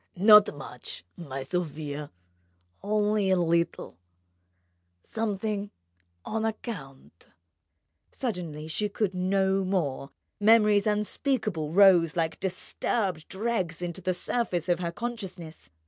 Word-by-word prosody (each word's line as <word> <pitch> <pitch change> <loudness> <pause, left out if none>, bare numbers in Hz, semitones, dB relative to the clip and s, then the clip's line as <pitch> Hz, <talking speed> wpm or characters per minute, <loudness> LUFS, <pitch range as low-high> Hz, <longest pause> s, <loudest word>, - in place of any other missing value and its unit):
Not 210 +2 +7
much, 125 -9 -8
my 135 -5 -6
Sofia... 150 -2 -4 0.7
only 210 0 +1
a 190 - +4
little... 170 - 0 1.0
something 210 -1 -2 0.6
on 220 0 -2
account 195 - -6 0.4
..." 80 - -52
Suddenly 170 - -4
she 210 +6 0
could 205 -1 -1
no 190 +1 +1
more: 160 -8 -1 0.3
memories 210 -1 +5
unspeakable 210 - -1
rose 175 -4 +6
like 165 -2 -1
disturbed 190 -2 -2
dregs 190 -5 -2
to 175 +1 -5
the 185 0 0
surface 180 -3 -1
of 175 0 +2
her 170 -1 -2
consciousness. 190 -7 -7
185 Hz, 105 wpm, -27 LUFS, 165-210 Hz, 1.0 s, Not